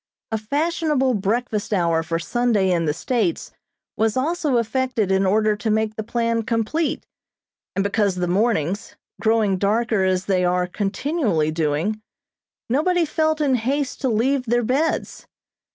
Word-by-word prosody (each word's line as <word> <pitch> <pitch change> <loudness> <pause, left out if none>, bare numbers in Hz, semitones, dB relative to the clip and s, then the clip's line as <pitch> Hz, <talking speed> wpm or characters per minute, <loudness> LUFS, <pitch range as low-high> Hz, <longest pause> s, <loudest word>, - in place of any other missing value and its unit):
A 220 - +1
fashionable 290 +2 0
breakfast 215 +1 -1
hour 170 -5 +2
for 165 +1 -2
Sunday 205 +1 +1
in 170 -2 +1
the 150 - +2
States 245 - -1 0.4
was 220 +1 +1
also 300 -1 +1
affected 235 -3 0
in 190 0 +2
order 215 +2 +2
to 215 +2 -3
make 220 0 0
the 220 - -3
plan 230 +1 0
complete, 230 +8 -1 0.7
and 195 - +1
because 200 -1 +1
the 180 -1 -1
mornings, 195 -1 0 0.3
growing 220 -4 +2
darker 215 0 +1
as 185 0 +1
they 185 -2 +1
are 180 0 +1
continually 200 - -1
doing, 160 +7 -1 0.7
nobody 335 +7 +2
felt 315 0 0
in 280 -3 +2
haste 260 +3 -1
to 265 - +1
leave 250 +4 +1
their 240 +1 +2
beds. 275 +8 -1
220 Hz, 145 wpm, -22 LUFS, 195-260 Hz, 0.7 s, hour